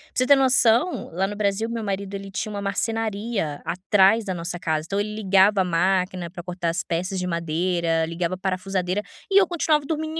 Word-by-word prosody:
você 255 Hz, -, +2 dB
ter 280 Hz, -, +8 dB
noção, 255 Hz, +3 st, +3 dB
lá 185 Hz, +3 st, 0 dB
no 205 Hz, -, -5 dB
Brasil, 205 Hz, +2 st, 0 dB
meu 230 Hz, -1 st, -4 dB
marido, 200 Hz, -1 st, -3 dB
ele 195 Hz, 0 st, -6 dB
tinha 210 Hz, +3 st, -3 dB
uma 200 Hz, -, -4 dB
marcenaria 205 Hz, -4 st, -2 dB
atrás 195 Hz, +4 st, +3 dB
da 190 Hz, -, -2 dB
nossa 175 Hz, 0 st, -4 dB
casa, 155 Hz, -2 st, -1 dB
então 200 Hz, +2 st, -1 dB
ele 210 Hz, +1 st, -2 dB
ligava 195 Hz, -1 st, +4 dB
a -, -, +3 dB
máquina 180 Hz, 0 st, 0 dB
para 175 Hz, -, -8 dB
cortar 175 Hz, -1 st, -3 dB
as 170 Hz, +3 st, -2 dB
peças 185 Hz, +3 st, -2 dB
de 180 Hz, -, -2 dB
madeira, 170 Hz, 0 st, 0 dB
ligava 170 Hz, +2 st, -3 dB
a -, -, -12 dB
parafusadeira 185 Hz, 0 st, -2 dB, 0.3 s
e 395 Hz, -, +7 dB
eu 375 Hz, -, +2 dB
continuava 310 Hz, -4 st, +1 dB
dormindo 315 Hz, +1 st, -3 dB
195 Hz, 200 wpm, -23 LUFS, 180-220 Hz, 0.3 s, ter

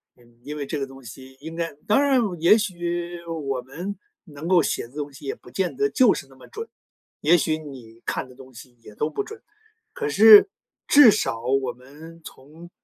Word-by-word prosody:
嗯， 120 Hz, -1 st, -25 dB
因 150 Hz, +1 st, -7 dB
为 145 Hz, -, -4 dB
这 150 Hz, -, -4 dB
个 135 Hz, -, -2 dB
东 135 Hz, 0 st, -14 dB
西 130 Hz, +3 st, -13 dB
应 160 Hz, +2 st, -8 dB
该 165 Hz, 0 st, -3 dB
当 215 Hz, +7 st, +4 dB
然 275 Hz, -2 st, +3 dB, 0.2 s
也 175 Hz, +6 st, +6 dB
许 175 Hz, -3 st, -4 dB
我 145 Hz, -6 st, -4 dB
们 170 Hz, +11 st, -7 dB, 0.3 s
能 155 Hz, -1 st, -9 dB
够 180 Hz, -2 st, +5 dB
写 -, -, -2 dB
的 125 Hz, -, -23 dB
东 145 Hz, -1 st, -5 dB
西 135 Hz, -, -13 dB
也 135 Hz, -, -2 dB
不 -, -, -17 dB
见 180 Hz, +8 st, -3 dB
得 420 Hz, 0 st, +1 dB
就 255 Hz, -, +4 dB
是 135 Hz, -, -7 dB
那 135 Hz, -, -19 dB
么 130 Hz, -, -16 dB
准， 450 Hz, +1 st, -8 dB, 0.5 s
也 170 Hz, +4 st, +5 dB
许 155 Hz, 0 st, 0 dB
你 125 Hz, -7 st, -12 dB
看 -, -, -3 dB
的 125 Hz, -, -16 dB
东 130 Hz, 0 st, -15 dB
西 120 Hz, +2 st, -14 dB
也 105 Hz, -, -14 dB
都 150 Hz, -, -1 dB
不 410 Hz, -, -3 dB
准， 435 Hz, +1 st, -11 dB, 0.5 s
可 445 Hz, -3 st, -3 dB
是 215 Hz, -, +8 dB, 0.4 s
至 285 Hz, -5 st, +8 dB
少 115 Hz, -, -2 dB
我 130 Hz, +1 st, 0 dB
们 155 Hz, +6 st, -15 dB
从， 155 Hz, +6 st, -13 dB
155 Hz, 225 characters per minute, -23 LUFS, 130-180 Hz, 0.5 s, 是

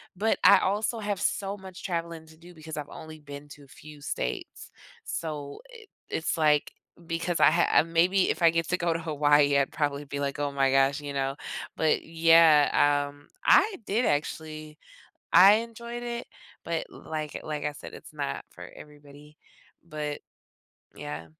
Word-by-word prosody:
but 220 Hz, +4 st, +1 dB
I -, -, +8 dB
also 210 Hz, +4 st, -1 dB
have 205 Hz, -2 st, -3 dB
so 200 Hz, 0 st, -1 dB
much 190 Hz, -2 st, -11 dB
traveling 170 Hz, -2 st, -4 dB
to 160 Hz, 0 st, -17 dB
do 175 Hz, +2 st, -15 dB
because 160 Hz, -1 st, -9 dB
I've 145 Hz, -1 st, -5 dB
only 155 Hz, 0 st, -10 dB
been 145 Hz, 0 st, -10 dB
to 145 Hz, 0 st, -13 dB
a 140 Hz, -, -18 dB
few 150 Hz, +2 st, -14 dB
states. 60 Hz, -, -5 dB, 0.3 s
So 150 Hz, -3 st, -5 dB
i 450 Hz, -2 st, -13 dB, 0.3 s
it's 165 Hz, +1 st, -2 dB
like 150 Hz, -2 st, +2 dB, 0.3 s
because 165 Hz, +1 st, -2 dB
I -, -, +6 dB
ha 170 Hz, +2 st, +2 dB
ah -, -, +5 dB
maybe 175 Hz, +3 st, +2 dB
if -, -, -5 dB
I 165 Hz, -, +7 dB
get 165 Hz, -1 st, -1 dB
to 180 Hz, -, +1 dB
go 170 Hz, -2 st, 0 dB
to -, -, -1 dB
Hawaii, 145 Hz, -2 st, +3 dB
I'd 140 Hz, -1 st, +1 dB
probably 145 Hz, -1 st, -2 dB
be 140 Hz, 0 st, -5 dB
like, 140 Hz, 0 st, -3 dB
"Oh, 145 Hz, -1 st, -1 dB
my 135 Hz, -1 st, +1 dB
gosh." 135 Hz, +2 st, +3 dB
You 145 Hz, -1 st, -6 dB
know? 135 Hz, 0 st, -1 dB, 0.4 s
But, 160 Hz, -1 st, +1 dB
yeah, 160 Hz, -3 st, +4 dB
um, 145 Hz, 0 st, -18 dB, 0.2 s
I 430 Hz, -3 st, +5 dB
did 225 Hz, +5 st, 0 dB
actually 155 Hz, +1 st, -3 dB, 0.6 s
I 195 Hz, +3 st, +9 dB
enjoyed 235 Hz, +1 st, -5 dB
it, 240 Hz, 0 st, -5 dB, 0.4 s
but 165 Hz, -1 st, -3 dB
l -, -, -14 dB
like 155 Hz, -2 st, -4 dB
like 150 Hz, -1 st, -4 dB
I 150 Hz, -, -2 dB
said, -, -, -11 dB
it's -, -, -12 dB
not 70 Hz, -, -4 dB
for -, -, -12 dB
everybody. 150 Hz, 0 st, -15 dB, 0.5 s
But 150 Hz, -3 st, -5 dB, 0.8 s
yeah. 75 Hz, +3 st, -7 dB
155 Hz, 175 wpm, -27 LUFS, 145-170 Hz, 0.8 s, I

